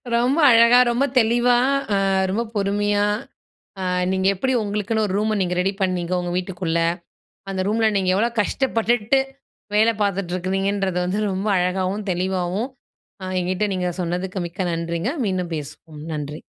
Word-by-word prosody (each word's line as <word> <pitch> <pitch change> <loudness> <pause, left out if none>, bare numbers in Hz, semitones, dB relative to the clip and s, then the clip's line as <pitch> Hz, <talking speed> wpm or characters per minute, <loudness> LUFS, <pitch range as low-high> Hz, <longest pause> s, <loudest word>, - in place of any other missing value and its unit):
ரொம்ப 255 +7 +2
அழகா, 235 +2 +7
ரொம்ப 255 +4 +1
தெளிவா, 240 +2 +3 0.4
அ - - +3 0.3
ரொம்ப 230 +4 0
பொறுமையா 205 +1 +1 0.8
அ - - -3 0.3
நீங்க 190 0 0
எப்படி 260 +8 -1
உங்களுக்குன்னு 210 +1 -1
ஒரு 190 - -3
ரூம 215 0 0
நீங்க 180 -1 0
ரெடி 195 +2 +1
பண்ணீங்க? 185 -2 -1
உங்க 175 0 -4
வீட்டுக்குள்ள. 175 -2 -2 0.7
அந்த 190 -1 -2
ரூமுல 220 +1 +2
நீங்க 185 -1 0
எவ்வளோ 230 +4 +2
கஷ்டப்பட்டுட்டு 235 +1 +1 0.6
வேல 220 +2 +5
பாத்துட்டு 195 -3 -1
இருக்கிறீங்கன்றது, 195 0 -1
வந்து 195 +4 -1
ரொம்ப 190 +3 -2
அழகாகவும், 185 +3 -1
தெளிவாகவும் 185 +5 -1 0.5
ஆ - - -4 0.2
என்கிட்ட 185 +4 -1
நீங்க 180 -1 -1
சொன்னதுக்கு 180 +2 -3
மிக்க 185 +3 -6
நன்றிங்க. 170 +7 -2
மீண்டும் 180 -3 -2
பேசுவோம். 150 +1 -9
நன்றி. 150 0 -5
195 Hz, 140 wpm, -22 LUFS, 180-215 Hz, 0.8 s, அழகா